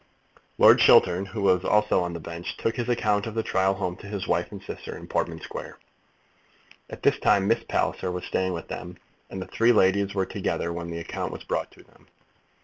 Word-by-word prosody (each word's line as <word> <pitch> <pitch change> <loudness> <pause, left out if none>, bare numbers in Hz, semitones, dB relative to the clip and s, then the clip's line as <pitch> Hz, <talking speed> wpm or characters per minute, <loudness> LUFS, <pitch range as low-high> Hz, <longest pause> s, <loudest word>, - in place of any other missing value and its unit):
Lord - - +7
Chiltern, 90 +2 +5
who 100 +1 -5
was 95 -1 +3
also 105 -3 +3
on 90 -1 -3
the 85 - -5
bench, 85 +1 -7
took 115 - -1
his 120 0 -2
account 105 -3 +1
of 110 - -6
the 115 - 0
trial 95 -1 +1
home 90 -3 -3
to 100 - -11
his 100 -2 -4
wife 90 +1 0
and 100 - -7
sister 95 - -8
in - - -10
Portman - - -2
Square. - - -8 1.1
At - - -10
this - - +3
time 100 0 +3
Miss 115 - +2
Palliser 90 - -1
was 90 0 -5
staying 95 0 -1
with 85 - -6
them, 90 0 -7 0.3
and 95 - -6
the 95 - -5
three 115 +1 +3
ladies 100 -1 +3
were 95 -1 +1
together 85 -2 -2
when 85 0 -5
the 85 - -5
account 85 - -4
was - - -8
brought - - -2
to - - -17
them. - - -25
95 Hz, 215 wpm, -26 LUFS, 90-105 Hz, 1.1 s, Lord